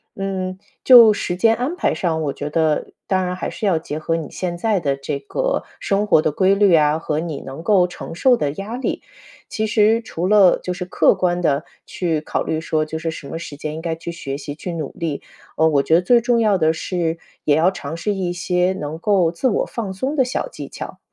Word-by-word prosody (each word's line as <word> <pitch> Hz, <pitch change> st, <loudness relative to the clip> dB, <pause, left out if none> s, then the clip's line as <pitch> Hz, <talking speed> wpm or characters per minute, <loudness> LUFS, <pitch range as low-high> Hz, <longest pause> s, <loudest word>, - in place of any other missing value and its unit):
嗯， 190 Hz, -1 st, -3 dB, 0.2 s
就 235 Hz, -4 st, +9 dB
时 175 Hz, -3 st, -3 dB
间 225 Hz, +5 st, +3 dB
安 260 Hz, +9 st, -2 dB
排 -, -, 0 dB
上， 160 Hz, -3 st, -1 dB
我 140 Hz, -2 st, -2 dB
觉 145 Hz, -, -5 dB
得 155 Hz, -1 st, +1 dB, 0.2 s
当 185 Hz, -1 st, +1 dB
然 180 Hz, 0 st, -2 dB
还 185 Hz, -, -4 dB
是 -, -, -5 dB
要 180 Hz, -5 st, +2 dB
结 155 Hz, -2 st, -6 dB
合 165 Hz, +1 st, -1 dB
你 160 Hz, -4 st, -6 dB
现 175 Hz, -2 st, -4 dB
在 210 Hz, +1 st, +1 dB
的 140 Hz, -5 st, 0 dB
这 140 Hz, +1 st, -3 dB
个 -, -, -2 dB, 0.2 s
生 200 Hz, +1 st, 0 dB
活 160 Hz, -, +5 dB
的 155 Hz, -, 0 dB
规 190 Hz, +5 st, +3 dB
律 200 Hz, -3 st, +5 dB
啊、 150 Hz, 0 st, +3 dB
和 155 Hz, -2 st, -2 dB
你 160 Hz, -4 st, -4 dB
能 135 Hz, +5 st, -8 dB
够 180 Hz, -1 st, +4 dB
承 175 Hz, -, -8 dB
受 250 Hz, +8 st, +4 dB
的 145 Hz, -, -1 dB
压 200 Hz, +8 st, -6 dB
力。 255 Hz, -, -3 dB, 0.5 s
其 220 Hz, -, -2 dB
实 220 Hz, +1 st, +3 dB
除 180 Hz, -5 st, -3 dB
了 200 Hz, -3 st, +5 dB
就 180 Hz, -, -3 dB
是 180 Hz, 0 st, -5 dB
客 180 Hz, -, +3 dB
观 180 Hz, -1 st, 0 dB
地 150 Hz, -3 st, +1 dB, 0.2 s
去 165 Hz, -4 st, -2 dB
考 -, -, -2 dB
虑 160 Hz, -, -2 dB
说， 155 Hz, -1 st, 0 dB
就 160 Hz, +1 st, -5 dB
是 165 Hz, +1 st, -3 dB
什 155 Hz, -3 st, -9 dB
么 165 Hz, -, -5 dB
时 155 Hz, -3 st, -8 dB
间 150 Hz, +1 st, -5 dB
应 160 Hz, -, -6 dB
该 165 Hz, -1 st, -2 dB
去 165 Hz, +1 st, -7 dB
学 140 Hz, -5 st, -5 dB
习、 145 Hz, 0 st, -6 dB
去 175 Hz, +3 st, -6 dB
努 155 Hz, -4 st, -4 dB
力。 160 Hz, -4 st, -4 dB, 0.4 s
呃， 160 Hz, -, +4 dB
我 145 Hz, -3 st, +3 dB
觉 160 Hz, -, +3 dB
得 170 Hz, -, +4 dB
最 235 Hz, +6 st, +4 dB
重 240 Hz, 0 st, +2 dB
要 210 Hz, -3 st, +3 dB
的 160 Hz, -2 st, +3 dB
是， 165 Hz, 0 st, -2 dB, 0.3 s
也 145 Hz, -, +4 dB
要 165 Hz, +4 st, +3 dB
尝 160 Hz, -4 st, -6 dB
试 190 Hz, +5 st, -1 dB
一 185 Hz, -3 st, -2 dB
些 180 Hz, +1 st, 0 dB
能 150 Hz, +2 st, -5 dB
够 185 Hz, -3 st, +2 dB
自 170 Hz, +9 st, -1 dB
我 230 Hz, -, +1 dB
放 220 Hz, -5 st, -5 dB
松 265 Hz, +10 st, -3 dB
的 270 Hz, -, +4 dB
小 255 Hz, -, -2 dB
技 -, -, -8 dB
巧。 -, -, -8 dB
175 Hz, 255 characters per minute, -20 LUFS, 160-200 Hz, 0.5 s, 就